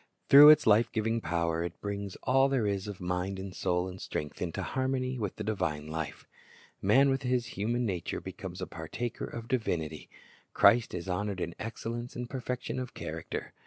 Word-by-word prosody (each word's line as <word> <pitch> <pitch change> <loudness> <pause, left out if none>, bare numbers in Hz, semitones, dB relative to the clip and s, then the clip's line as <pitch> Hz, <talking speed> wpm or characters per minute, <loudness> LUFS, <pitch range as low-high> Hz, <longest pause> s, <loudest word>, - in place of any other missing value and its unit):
Through 145 +2 +11
its 155 -1 +7
life 110 +2 +5
giving 115 +1 0
power 85 -1 0
it 85 0 -6
brings 100 -1 -4
all 135 +1 +4
there 130 -5 +1
is 100 -1 -1
of 100 -2 -6
mind 90 +2 -2
and 95 -1 -7
soul 90 -1 0
and 95 0 -8
strength 75 -1 -5
into 85 -2 -2
harmony 130 -1 -1
with 105 -4 -3
the 110 - -5
divine 90 -8 -2
life. 80 0 -5 0.6
Man 135 +7 +5
with 135 0 0
his 125 -2 0
human 120 +5 -1
nature 90 -6 -2
becomes - - -7
a - - -1
partaker 120 -1 -5
of 115 -1 -7
divinity. 80 - -2 0.5
Christ 115 -4 +5
is 90 +1 -5
honored 95 +1 -2
in 85 -1 -3
excellence 115 +1 -5
and 120 0 -4
perfection 125 0 -4
of 130 -1 -6
character. - - -5
105 Hz, 180 wpm, -30 LUFS, 90-125 Hz, 0.6 s, Through